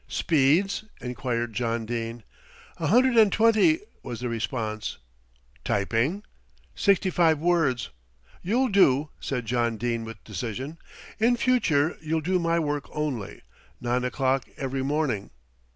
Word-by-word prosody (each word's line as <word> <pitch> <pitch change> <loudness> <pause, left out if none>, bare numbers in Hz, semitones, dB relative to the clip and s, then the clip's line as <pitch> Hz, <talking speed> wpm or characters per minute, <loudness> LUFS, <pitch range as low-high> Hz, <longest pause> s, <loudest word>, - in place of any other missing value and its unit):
"Speeds?" 165 +7 +2 0.2
enquired 120 -1 -3
John 115 0 -1
Dene. 115 0 -4 0.5
"A - - -2
hundred 255 0 +4
and 215 -3 +6
twenty 230 - +4
" - - -36
was 120 - -6
the 125 0 -3
response. 110 -2 -3 0.7
"Typing?" 115 - 0 0.5
"Sixty 195 -2 +2
five 165 -3 +3
words 160 -6 +1 0.3
" - - -29
"You'll 245 +8 +1
do," 150 -7 +4
said 125 -4 -3
John 115 0 0
Dene 115 +1 -2
with 115 0 -9
decision. 120 - -5 0.4
"In 235 +3 +4
future 180 - +2
you'll 160 0 -1
do 180 +4 +1
my 170 0 +1
work 145 -3 -1
only. 140 -10 -4 0.4
Nine 125 +1 0
o'clock, 130 +1 0
every 135 -1 -2
morning." 135 -7 -1
135 Hz, 135 wpm, -26 LUFS, 120-175 Hz, 0.7 s, and